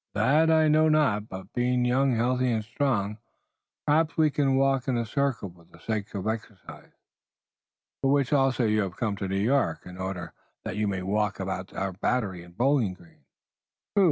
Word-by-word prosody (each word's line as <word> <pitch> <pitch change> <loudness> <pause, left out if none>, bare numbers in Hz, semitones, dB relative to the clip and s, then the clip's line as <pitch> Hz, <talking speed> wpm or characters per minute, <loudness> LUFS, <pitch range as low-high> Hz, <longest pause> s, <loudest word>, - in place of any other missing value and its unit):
"That 145 +10 +3
I 160 -1 +4
know 155 +1 +4
not, 130 -9 +2
but 95 0 -9
being 125 0 +1
young, 130 +1 +2
healthy 125 +2 +1
and 110 -2 0
strong, 110 -4 -1 0.7
perhaps 160 +2 +2
we 155 -2 +4
walk 135 -1 +2
in 130 -2 +1
a 115 - -1
circle 120 -5 -1
for 85 -1 -20
the - - -19
sake 105 +3 -4
of 95 -1 -4
exercise." 110 -3 -6 1.1
"For 135 - +2
which 140 -1 +2
also 135 -3 +2
you 110 0 +2
have 95 -2 -4
come 110 -4 -1
to 95 - -3
New 95 +1 -1
York 130 +7 +1
in 90 0 -10
order 90 -3 -5 0.3
that - - -4
you 105 0 0
may 95 -2 -2
walk 105 +1 -1
about 95 0 -4
our 95 -1 -2
Battery 95 -2 -1
and 85 +1 -16
Bowling 125 -7 +2
Green." 85 -2 -21 0.7
"True! - - +4
115 Hz, 185 wpm, -27 LUFS, 95-135 Hz, 1.1 s, I